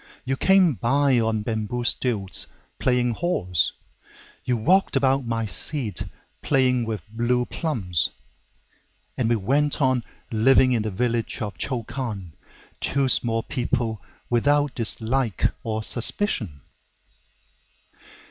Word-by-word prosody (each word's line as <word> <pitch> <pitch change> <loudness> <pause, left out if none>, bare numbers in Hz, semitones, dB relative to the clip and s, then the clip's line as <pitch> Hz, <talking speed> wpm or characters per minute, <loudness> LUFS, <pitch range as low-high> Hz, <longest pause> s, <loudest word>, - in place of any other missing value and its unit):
You 135 +1 0
came 190 +1 +4
by 130 +4 +2
on 110 -2 0
bamboo 110 +2 -2
stilts, 110 -6 -1 0.3
playing 125 -1 +2
horse; 110 - 0 0.7
You 125 -1 0
walked 180 - +3
about 135 -1 +2
my 115 -1 -1
seat, 110 - 0 0.4
playing 125 -3 +2
with 110 -6 -4
blue 120 +3 0
plums. 100 - -1 1.1
And 120 -4 0
we 120 - +3
went 140 +8 +1
on 130 -4 +2 0.3
living 130 +3 +5
in 120 -3 +2
the 110 - -2
village 115 +4 -1
of 105 -4 -5
Chokan:Two 120 - -4
small 115 -2 +1
people, 120 -5 -2 0.3
without 145 +4 +2
dislike 115 0 +1
or 110 -1 -2
suspicion. 110 - 0
120 Hz, 110 wpm, -24 LUFS, 110-135 Hz, 1.1 s, living